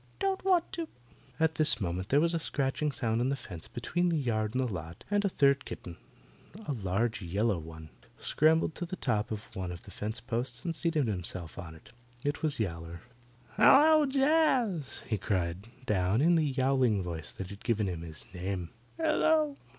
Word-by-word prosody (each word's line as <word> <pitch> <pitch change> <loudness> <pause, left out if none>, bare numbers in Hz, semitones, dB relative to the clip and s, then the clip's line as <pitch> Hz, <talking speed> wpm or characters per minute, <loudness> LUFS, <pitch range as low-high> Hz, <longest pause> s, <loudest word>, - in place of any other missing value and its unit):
"Don't 390 -1 -1
want 365 -3 +2
to." 335 -1 -4 0.5
At 160 0 +3
this 155 -8 +4
moment 90 -1 -3
there 140 - +5
was 170 +2 +2
a 165 - +1
scratching 145 0 -1
sound 115 -3 -1
on 125 - +1
the 140 - +1
fence 90 -11 -9
between 175 +9 -1
the 165 - +1
yard 110 -5 -1
and 130 - +2
the 110 - -4
lot, 85 -1 -7
and 205 0 +2
a 200 - +2
third 140 -5 +3
kitten, 85 - -8 0.7
a - - -1
large 110 +1 -1
yellow 100 +2 0
one, 80 -1 -10 0.3
scrambled 160 +1 +3
to 175 - -4
the 185 - -4
top 105 - -1
of 110 -1 -4
one 95 -2 -3
of 85 -1 -8
the 100 - -12
fence 110 +4 -4
posts 120 0 -3
and 165 -1 -1
seated 160 -4 +1
himself 90 -4 -4
on 80 -3 -8
it. 80 - -17 0.3
It 145 +1 -1
was 155 -4 0
Yowler. 85 -4 -4 0.6
"Hello, 305 +1 +7
Jaz!" 270 - +2
he 110 -5 -2
called 95 0 -1 0.2
down, 95 0 +2
in 165 +5 +5
the 160 -3 +3
yowling 130 -6 +2
voice 85 -2 -4
that 95 0 -7
had 100 - -10
given 110 -3 +1
him 90 -4 -3
his 80 -2 -8
name. 90 -1 -4 0.3
"Hello!" 310 -2 +2
120 Hz, 190 wpm, -30 LUFS, -, 0.7 s, Hello